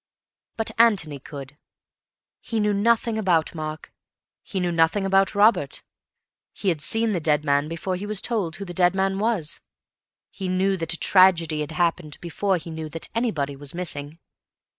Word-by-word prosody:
But 225 - -1
Antony 190 -11 +3
could. 140 +1 -10 0.8
He 225 - -3
knew 210 -1 +2
nothing 225 +2 +1
about 175 -6 +1
Mark; 155 -1 -6 0.5
he 195 - -4
knew 180 -1 0
nothing 165 +4 +2
about 195 0 +2
Robert. 205 -9 +3 0.7
He 195 - -1
had 160 -4 -1
seen 225 +7 +1
the 185 - 0
dead 150 -1 +1
man 145 +1 +2
before 170 +3 -3
he 200 +3 -5
was 210 -2 +2
told 200 -9 -1
who 200 - -6
the 175 - -7
dead 180 +1 +3
man 195 0 0
was. 210 -8 -1 0.7
He 190 - -5
knew 190 +1 +1
that 165 -1 0
a - - -1
tragedy 170 -5 +4
had 150 +1 -5
happened 165 -3 -1
before 185 +3 -1
he 165 0 -8
knew 160 -1 -6
that 165 +2 -7
anybody 160 - -1
was 140 +2 -3
missing. 155 -4 -5
180 Hz, 170 wpm, -24 LUFS, 155-200 Hz, 0.8 s, tragedy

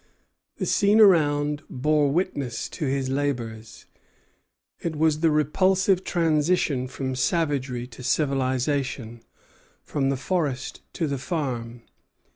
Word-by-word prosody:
The - - -2
scene 205 +1 +3
around 150 -7 +4
bore 150 +2 +2
witness 140 -7 -2
to 155 - -4
his 135 0 -1
labors. 120 -6 -3 0.9
It 165 -2 -3
was 155 0 +2
the 165 0 +3
repulsive 185 +5 +2
transition 155 -5 +1
from 130 0 -4
savagery 135 -5 0
to 125 0 -12
civilization, 130 -3 -1 0.6
from 135 -2 -1
the 135 - 0
forest 145 -3 -2
to 165 - -1
the 140 -3 -2
farm. 125 -6 -4
145 Hz, 110 wpm, -25 LUFS, 130-160 Hz, 0.9 s, around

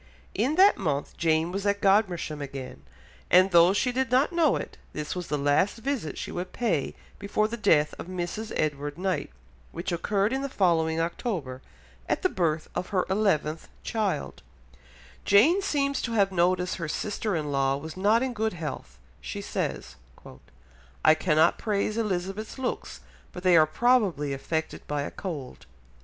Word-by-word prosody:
In 250 +10 0
that 390 +3 +6
month 145 -7 -2
Jane 160 0 +1
was 195 +1 -3
at 200 0 +1
Godmersham 185 -7 +1
again, 135 -2 -7 0.5
and 185 +2 +6
though 170 +1 +7
she 240 +6 +1
did 260 0 -1
not 260 +7 +2
know 330 -5 +3
it, - - -6
this 150 +2 -4
was 180 -1 -5
the 150 - -1
last 145 +10 +2
visit 235 - -3
she - - -5
would 180 +1 -5
pay 185 - -1 0.2
before 210 +1 0
the 230 - -4
death 160 -9 +3
of - - -7
Mrs. 185 +4 -4
Edward 145 -1 -2
Knight, 185 -3 -1 0.4
which 170 +3 -4
occurred 200 +6 0
in 265 - -1
the 275 - -3
following 165 -7 +1
October, 165 - -3 0.5
at - - 0
the 370 - +3
birth 160 - -1
of 180 - -3
her 190 -3 +1
eleventh 165 -6 0
child; 195 - -2 0.8
Jane 310 - +5
seems 280 -7 0
to 235 - -3
have 200 -3 +3
noticed 180 0 +1
her 165 -3 -4
sister 210 +3 -2
in 150 -2 -2
law 135 0 +1
was 155 +2 -8
not 210 +6 +3
in 260 -1 -2
good 220 -1 -1
health, 160 -3 -6 0.2
she 60 -1 -6
says, - - -4 1.1
"I 155 - +8
cannot 155 +1 +2
praise 210 0 -1
Elizabeth's 205 0 -3
looks, 260 -1 -4 0.3
but 180 - -9
they 180 -2 +5
are 155 -1 +6
probably 190 - +2
affected 160 +4 -3
by 145 -1 -1
a - - -5
cold." 155 -10 -7
185 Hz, 165 wpm, -27 LUFS, 155-215 Hz, 1.1 s, I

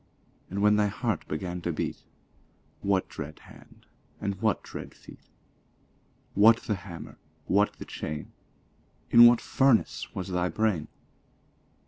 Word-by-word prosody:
And 100 +2 -2
when 105 0 +5
thy 105 -1 +3
heart 110 -2 -2
began 90 +3 -4
to 85 - -2
beat, 75 - -4 0.8
What 100 -1 +1
dread 75 +1 -8
hand? - - -17 0.3
& 100 -2 -5
what 110 -3 +1
dread - - -9
feet? - - -16 1.0
What 110 +3 +6
the 105 - -1
hammer? 90 -3 -9 0.3
what 100 +2 +2
the - - -10
chain? 75 -1 -6 0.8
In 120 0 +10
what 120 -1 +5
furnace 135 -4 +2
was 95 0 -4
thy 90 -1 0
brain? 105 -8 0
100 Hz, 130 wpm, -28 LUFS, 90-110 Hz, 1.0 s, In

